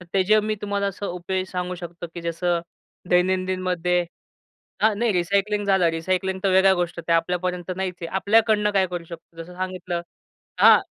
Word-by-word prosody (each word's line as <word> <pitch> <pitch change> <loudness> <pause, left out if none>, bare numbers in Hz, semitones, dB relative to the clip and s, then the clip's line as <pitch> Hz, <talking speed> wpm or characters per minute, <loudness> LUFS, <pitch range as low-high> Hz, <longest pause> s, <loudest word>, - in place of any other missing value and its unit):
तर - - -11
त्याचे 200 +3 +4
मी 215 +1 -1
तुम्हाला 200 -1 -1
असं 200 +1 -4
उपाय 185 +1 -3
सांगू 180 -1 -4
शकतो, 175 -1 -8
की 170 - -5
जसं 170 +1 0 0.5
दैनंदिनमध्ये 180 -1 +1 0.8
हां, 215 0 +4
नाही, 235 -1 +2
रिसायकलिंग 200 +3 +1
झालं, 190 -3 +3
रिसायकलिंग 185 +3 -1
तर 195 - +3
वेगळ्या 190 +1 +5
गोष्ट, 175 -1 -2
त्या 165 - +4
आपल्यापर्यंत 180 +1 -2
नाहीच 190 -1 -2
आहे. - - -2
आपल्याकडनं 210 +1 +3
काय 195 -2 +3
करू 175 -1 -5
शकतो 165 0 -10
जसं 180 +2 -12
सांगितलं 185 -2 -3 0.6
हां. - - +8
185 Hz, 165 wpm, -23 LUFS, 175-195 Hz, 0.8 s, हां